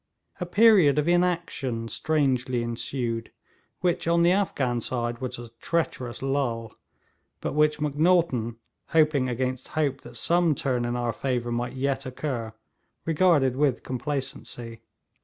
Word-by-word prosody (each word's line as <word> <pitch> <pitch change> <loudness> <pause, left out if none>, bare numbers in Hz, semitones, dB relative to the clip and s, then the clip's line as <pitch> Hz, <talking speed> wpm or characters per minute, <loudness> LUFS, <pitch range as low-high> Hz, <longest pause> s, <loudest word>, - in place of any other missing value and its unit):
A 180 - -3
period 195 -7 +6
of 150 +1 +1
inaction 175 -10 0
strangely 130 -4 0
ensued, 115 0 -3 0.5
which 175 -2 0
on 170 0 +4
the 175 - +5
Afghan 135 -11 0
side 120 -1 -2
was 125 -1 -3
a 120 -1 -9
treacherous 130 -8 -2
lull, 120 -5 -1 0.6
but - - -3
which 150 0 +3
Macnaghten, 150 -6 +2 0.3
hoping 150 -5 +3
against 130 +1 -2
hope 140 -3 +1
that - - -10
some 170 -3 +2
turn 125 -3 0
in 120 0 -1
our 120 -1 -1
favour 125 -3 -2
might 120 +1 -2
yet 135 0 -1
occur, 125 -4 -4 0.5
regarded 155 -6 +3
with 135 -2 +1
complacency. 125 -3 -5
135 Hz, 130 wpm, -26 LUFS, 120-155 Hz, 0.6 s, period